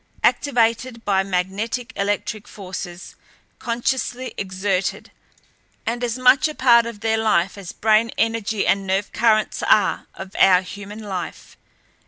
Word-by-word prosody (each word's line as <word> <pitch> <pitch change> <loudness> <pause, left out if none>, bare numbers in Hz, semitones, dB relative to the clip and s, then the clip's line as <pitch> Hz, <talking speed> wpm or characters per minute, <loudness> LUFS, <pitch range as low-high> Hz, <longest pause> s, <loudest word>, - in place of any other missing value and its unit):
Activated 235 -2 +1
by 195 -2 +3
magnetic 200 +7 -2
electric 205 +1 -2
forces 180 -2 -8 0.5
consciously 250 +1 -2
exerted 190 0 -2 0.7
and 240 +2 -2
as 240 0 -1
much 255 +3 +5
a 305 - -7
part 235 -2 +5
of 225 -3 -8
their 225 0 +1
life 190 -4 +1
as 195 -4 -8
brain 220 +1 +2
energy 225 -2 0
and 195 0 +1
nerve 195 +2 0
currents 215 -1 +2
are 205 -3 +2
of 190 +1 -9
our 185 -1 +6
human 205 +3 -9
life. 185 -6 -6
215 Hz, 130 wpm, -21 LUFS, 195-235 Hz, 0.7 s, our